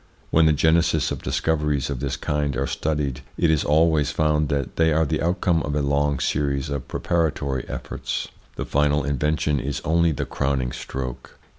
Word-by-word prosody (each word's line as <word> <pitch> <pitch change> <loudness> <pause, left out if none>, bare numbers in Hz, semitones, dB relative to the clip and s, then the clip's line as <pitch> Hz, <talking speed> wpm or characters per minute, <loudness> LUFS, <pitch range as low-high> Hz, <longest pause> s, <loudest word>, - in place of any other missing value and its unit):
When 80 0 +5
the - - +5
genesis 80 +1 +2
of - - -4
dis 65 0 -1
coveries 75 -4 0
of 65 - -3
this 70 +1 -2
kind 75 -3 -1
are 70 - 0
studied, 70 -4 -2 0.2
it 80 - +3
is 80 - +2
always 75 -1 +3
found 75 0 +1
that 70 -4 -2
they 80 0 +3
are 80 +1 +3
the - - -1
outcome 85 -1 +1
of 75 -1 -3
a 75 - +1
long 70 0 +1
series 70 0 -1
of 70 -2 -4
preparatory 75 -6 -1
efforts: - - -4 0.3
the - - -4
final 75 0 +2
invention 75 +1 0
is 70 +3 -3
only 85 +1 +3
the 70 - -2
crowning 65 -3 -1
stroke. 65 0 -6
75 Hz, 180 wpm, -23 LUFS, 70-80 Hz, 0.3 s, When